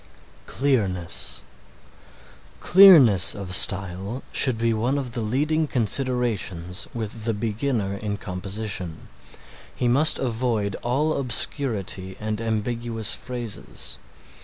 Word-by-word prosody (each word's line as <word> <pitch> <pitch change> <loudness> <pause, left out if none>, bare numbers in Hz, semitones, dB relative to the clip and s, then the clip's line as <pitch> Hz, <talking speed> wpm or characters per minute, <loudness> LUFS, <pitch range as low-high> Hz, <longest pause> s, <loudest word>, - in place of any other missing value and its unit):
CLEARNESS 90 - -1 1.2
Clearness 160 - +6
of 95 -2 -6
style 95 +4 +3
should 130 -4 +3
be 115 0 0
one 120 +6 -1
of 130 -4 -4
the 115 - -4
leading 150 +8 0
considerations 115 -8 -1
with 110 -1 -6
the 115 -2 -1
beginner 110 -2 -2
in 100 0 -4
composition. 95 -2 -5 0.7
He 125 - -1
must 140 +6 +3
avoid 115 -5 -2
all 145 +6 0
obscurity 110 -7 -1
and 110 +1 -4
ambiguous 115 0 -1
phrases. 100 - -4
110 Hz, 100 wpm, -23 LUFS, 100-125 Hz, 1.2 s, Clearness